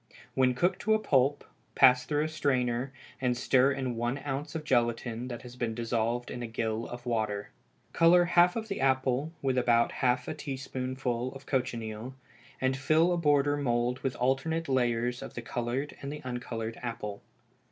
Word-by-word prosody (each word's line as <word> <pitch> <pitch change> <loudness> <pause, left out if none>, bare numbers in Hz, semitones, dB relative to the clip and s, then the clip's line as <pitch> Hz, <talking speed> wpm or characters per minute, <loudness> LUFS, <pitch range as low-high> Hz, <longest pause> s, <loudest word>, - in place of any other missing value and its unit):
When 130 -1 +3
cooked 175 +8 +1
to 220 +1 +3
a - - +1
pulp, 140 -6 +2 0.3
pass 125 0 +6
through 150 0 +1
a - - 0
strainer, 130 -4 0 0.3
and 125 -2 +1
stir 130 +2 +4
in 130 -3 -2
one 120 +3 -1
ounce 145 +2 -4
of 160 - -3
gelatine 120 -2 0
that 120 -1 -6
has 125 -1 -10
been 120 -3 -2
dissolved 115 +1 -1
in 120 - -5
a 120 - -3
gill 115 0 -2
of 120 0 -8
water. 110 -4 -2 0.4
Color 175 +1 +6
half 175 +1 +4
the 195 - -4
apple 130 +2 +1
with 130 -2 +2
about 120 -1 +3
half 125 -1 0
a - - -2
teaspoonful 130 -3 -3
of 135 0 -11
cochineal, 120 -2 -3 0.4
and 130 0 +1
fill 155 +6 +3
a - - 0
border 145 -3 +3
mould 120 -2 0
with 130 -1 -2
alternate 135 +6 0
layers 120 -1 +1
of - - -8
the 120 - -4
colored 120 +5 -3
and 145 +2 -5
uncolored 115 -2 -4
apple. 115 -4 -5
125 Hz, 170 wpm, -29 LUFS, 120-140 Hz, 0.4 s, pass